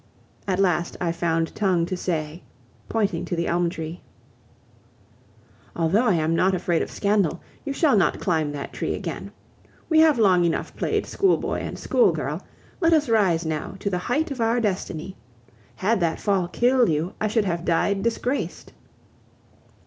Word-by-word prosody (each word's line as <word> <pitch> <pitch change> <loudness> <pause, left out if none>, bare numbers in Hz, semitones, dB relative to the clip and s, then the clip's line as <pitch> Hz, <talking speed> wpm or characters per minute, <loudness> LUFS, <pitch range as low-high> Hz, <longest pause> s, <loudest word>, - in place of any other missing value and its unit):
At 185 -2 +1
last 175 -3 +1
I 170 -2 0
found 165 -1 -1
tongue 185 -5 +1
to 185 - -3
say, 165 -2 -3 0.5
pointing 200 -6 0
to 175 - -3
the 170 0 -1
elm 175 0 +1
tree: 165 0 -6 1.7
"Although 175 +8 +2
I 195 - +4
am 160 0 +1
not 185 +2 +3
afraid 175 -2 0
of - - -3
scandal, 200 -5 +1 0.2
you 285 - -3
shall 280 -2 +3
not 190 -4 +2
climb 160 -5 0
that 145 -1 -6
tree - - -2
again. - - -6 0.6
We 320 -1 +5
have 315 -3 +5
long 185 -5 +4
enough 170 -1 -1
played - - -1
schoolboy 385 -2 +1
and - - -5
schoolgirl, 480 - +1 0.4
let 330 -2 +3
us 305 -5 +2
rise 185 -7 +2
now 155 +3 -3
to 200 +1 -3
the 180 - 0
height 290 - -1
of 260 -4 -4
our 230 +2 +2
destiny. 190 -4 -3 0.6
Had 210 +3 +1
that 165 -2 0
fall 195 -4 +1
killed 245 +4 +3
you, 160 +3 -1
I 215 - +2
should 215 0 +1
have 170 -2 -2
died 195 +3 +1
disgraced..." 235 +4 -2
185 Hz, 165 wpm, -24 LUFS, 170-225 Hz, 1.7 s, We